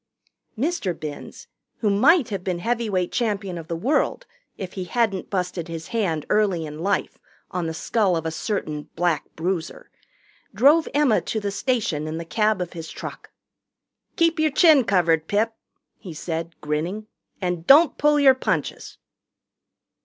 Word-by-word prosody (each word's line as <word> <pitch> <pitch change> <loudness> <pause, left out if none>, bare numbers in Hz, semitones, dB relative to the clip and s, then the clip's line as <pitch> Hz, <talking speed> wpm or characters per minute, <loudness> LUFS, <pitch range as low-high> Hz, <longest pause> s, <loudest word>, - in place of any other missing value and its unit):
Mr. 250 - -1
Binns, 150 -2 -8 0.3
who 210 -3 +2
might 270 - +4
have 195 -4 -4
been 185 -2 -1
heavyweight 210 -3 -1
champion 205 -6 -1
of 165 -2 -7
the 170 - -3
world 275 - 0 0.3
if 185 -2 -6
he 185 -2 -4
hadn't 210 -2 -1
busted 180 -3 -2
his 165 -1 -7
hand 185 -10 -1
early 195 -6 +1
in 150 0 -8
life 195 +4 -1 0.3
on 180 -2 -2
the 160 - -3
skull 195 0 +1
of 165 - -4
a 160 - -1
certain 155 -5 -3
Black 170 -3 0
Bruiser, 170 0 -4 0.6
drove 285 +9 +5
Emma 290 -7 +3
to 220 - -3
the 205 -1 -3
station 200 - -1
in 155 +1 -4
the 165 - -5
cab 215 +2 +1
of 175 - -4
his 165 -2 -7
truck. - - -8 0.9
"Keep 330 -1 +2
yer 310 0 +3
chin 300 -3 +5
covered, 170 -5 +2
Pip," 220 +2 +1 0.5
he 175 -6 -9
said, 165 +1 -4
grinning, 160 +8 -2 0.3
"and 180 -3 -3
don't 300 +3 +6
pull 295 0 +4
your 275 -2 +7
punches." 260 - -3
195 Hz, 155 wpm, -23 LUFS, 165-230 Hz, 0.9 s, your